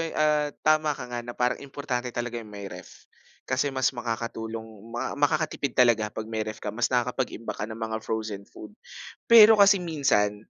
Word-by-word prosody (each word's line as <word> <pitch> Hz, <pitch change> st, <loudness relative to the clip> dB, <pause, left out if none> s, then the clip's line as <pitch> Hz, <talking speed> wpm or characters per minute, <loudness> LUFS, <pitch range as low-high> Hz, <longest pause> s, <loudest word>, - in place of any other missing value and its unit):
eh, 165 Hz, -, -5 dB
ah, 150 Hz, -1 st, +2 dB, 0.2 s
tama 155 Hz, -1 st, +3 dB
ka -, -, -8 dB
nga 120 Hz, -, -3 dB
na 120 Hz, -, -6 dB
parang 125 Hz, 0 st, 0 dB
importante 135 Hz, -3 st, -4 dB
talaga 120 Hz, -1 st, -3 dB
yung 110 Hz, -2 st, -12 dB
may 100 Hz, -1 st, -7 dB
ref. 90 Hz, -1 st, -12 dB, 0.4 s
Kasi 130 Hz, +2 st, -1 dB
mas 130 Hz, -, +2 dB
makakatulong 115 Hz, -2 st, -4 dB, 0.3 s
maka 130 Hz, +3 st, -3 dB
makakatipid 145 Hz, -2 st, 0 dB
talaga 115 Hz, -4 st, +4 dB
'pag 110 Hz, +1 st, -6 dB
may 110 Hz, -1 st, -2 dB
ref 110 Hz, -, -7 dB
ka 105 Hz, -, -2 dB
mas 115 Hz, +3 st, 0 dB
nakakapag-imbak 125 Hz, -1 st, -2 dB
ka 105 Hz, -, -2 dB
ng 110 Hz, -, -7 dB
mga 110 Hz, -1 st, -3 dB
frozen 110 Hz, -3 st, -4 dB
food. -, -, -12 dB, 0.6 s
Pero 225 Hz, -1 st, +10 dB
kasi 200 Hz, 0 st, +7 dB
minsan, 125 Hz, -, 0 dB
120 Hz, 185 wpm, -26 LUFS, 110-145 Hz, 0.6 s, Pero